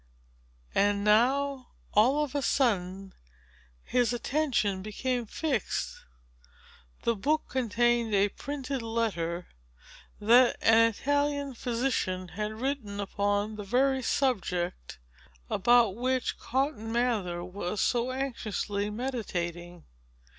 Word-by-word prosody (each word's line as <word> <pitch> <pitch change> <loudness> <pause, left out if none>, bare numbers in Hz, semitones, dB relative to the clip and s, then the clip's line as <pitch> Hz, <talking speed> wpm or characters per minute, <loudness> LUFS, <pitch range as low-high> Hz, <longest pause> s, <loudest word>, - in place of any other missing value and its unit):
And 200 0 +2
now, 260 +5 +2 0.2
all 260 +8 +4
of 290 - -5
a 285 - 0
sudden, 195 -8 0 0.7
his 245 -1 +1
attention 240 -7 0
became 235 +4 -2
fixed. 270 - -2 1.1
The 235 - +2
book 300 +10 +1
contained 240 -2 +1
a 200 +1 +3
printed 275 +1 -4
letter 190 -7 -2 0.7
that 240 +4 +5
an 225 0 +5
Italian 285 +3 -1
physician 230 -7 -1
had 210 +4 -4
written 225 -4 -3
upon 205 +1 -1
the 210 - -5
very 260 +5 +2
subject, 180 - -1 0.5
about 230 -1 +4
which 255 +1 -1
Cotton 260 -4 -1
Mather 215 -8 0
was 180 +2 -4
so 240 +3 +1
anxiously 215 -6 -2
meditating. 175 -8 -4
230 Hz, 100 wpm, -29 LUFS, 200-260 Hz, 1.1 s, that